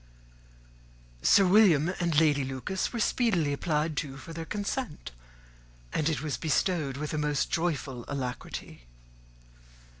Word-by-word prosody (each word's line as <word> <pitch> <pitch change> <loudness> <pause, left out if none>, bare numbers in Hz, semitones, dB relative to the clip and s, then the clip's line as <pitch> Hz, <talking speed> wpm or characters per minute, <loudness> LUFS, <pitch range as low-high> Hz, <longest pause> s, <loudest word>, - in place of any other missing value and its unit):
Sir 195 - +6
William 180 -4 +5
and 170 -4 +2
Lady 150 -3 +3
Lucas 135 +9 -3
were 235 - -4
speedily 190 - +1
applied 155 +1 -1
to 135 -3 -3
for 165 - -9
their 165 0 -5
consent; 205 - -4 0.8
and 155 0 +1
it 155 -2 -2
was 150 -2 -2
bestowed 155 -3 0
with 150 +1 -4
a 155 - -1
most 150 -1 0
joyful 145 -7 -1
alacrity. 125 - -6
155 Hz, 125 wpm, -29 LUFS, 140-175 Hz, 0.8 s, Sir